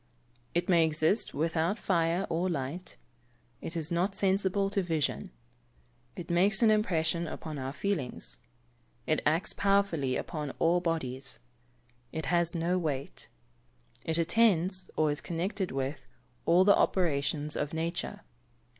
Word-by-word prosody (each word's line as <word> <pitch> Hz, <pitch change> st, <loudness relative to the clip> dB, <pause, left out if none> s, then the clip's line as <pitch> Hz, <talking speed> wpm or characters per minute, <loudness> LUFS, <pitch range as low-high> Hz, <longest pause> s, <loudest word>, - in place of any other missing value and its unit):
_ -, -, -39 dB, 0.5 s
It 175 Hz, -, +1 dB
may 170 Hz, -3 st, +5 dB
exist 160 Hz, +6 st, +1 dB
without 165 Hz, +6 st, 0 dB
fire 170 Hz, -1 st, +1 dB
or 170 Hz, +3 st, 0 dB
light. 155 Hz, +3 st, -4 dB, 0.7 s
It 170 Hz, -, -4 dB
is 160 Hz, +1 st, -2 dB
not 180 Hz, +4 st, 0 dB
sensible 195 Hz, 0 st, +2 dB
to 200 Hz, -1 st, +1 dB
vision. 165 Hz, +2 st, -1 dB, 0.9 s
It 175 Hz, -, -6 dB
makes 195 Hz, +5 st, +3 dB
an 220 Hz, -, +6 dB
impression 170 Hz, -5 st, +1 dB
upon 155 Hz, -3 st, -6 dB
our 130 Hz, 0 st, -3 dB
feelings. 155 Hz, -5 st, -2 dB, 0.7 s
It 155 Hz, -, +1 dB
acts 160 Hz, +5 st, +1 dB
powerfully 195 Hz, -10 st, +1 dB
upon 150 Hz, -5 st, -4 dB
all 170 Hz, +2 st, +3 dB
bodies. 135 Hz, -6 st, -3 dB, 0.7 s
It 160 Hz, -, -4 dB
has 170 Hz, 0 st, +2 dB
no 175 Hz, +2 st, +1 dB
weight. 145 Hz, -5 st, -4 dB, 0.7 s
It 160 Hz, 0 st, -1 dB
attends, 185 Hz, 0 st, +2 dB
or 155 Hz, -1 st, +2 dB
is 145 Hz, -, -3 dB
connected 185 Hz, +3 st, -2 dB
with, 135 Hz, 0 st, -4 dB, 0.4 s
all 175 Hz, +2 st, +6 dB
the 200 Hz, +1 st, +6 dB
operations 150 Hz, -3 st, +1 dB
of 145 Hz, -, -2 dB
nature. 165 Hz, +2 st, -3 dB
170 Hz, 135 wpm, -30 LUFS, 155-185 Hz, 0.9 s, an